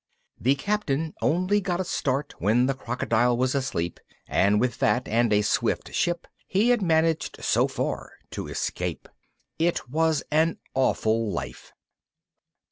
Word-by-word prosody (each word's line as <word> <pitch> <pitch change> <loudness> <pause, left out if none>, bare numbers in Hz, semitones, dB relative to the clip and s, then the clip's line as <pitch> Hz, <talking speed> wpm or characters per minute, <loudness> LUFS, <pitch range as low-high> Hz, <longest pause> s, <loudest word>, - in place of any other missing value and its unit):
The 135 +4 +3
Captain 160 -3 -1
only 185 +5 +2
got 180 -2 -1
a - - +1
start 140 -4 -1
when 110 +7 +3
the 135 - +1
crocodile 120 -2 0
was 130 +1 +1
asleep, 90 - -2 0.3
and 100 +2 +3
with 125 +2 0
that 125 - +2
and 115 +1 +2
a 105 0 +4
swift - - 0
ship 175 0 0 0.2
he 210 +5 +2
had 245 -3 +3
managed 160 -2 +1
so - - +3
far - - -3 0.2
to - - -5
escape. - - -3 0.5
It 165 -6 0
was 160 0 +2
an 160 +2 +2 0.2
awful 115 -4 +1
life! 85 - -6
135 Hz, 140 wpm, -26 LUFS, 120-165 Hz, 0.5 s, a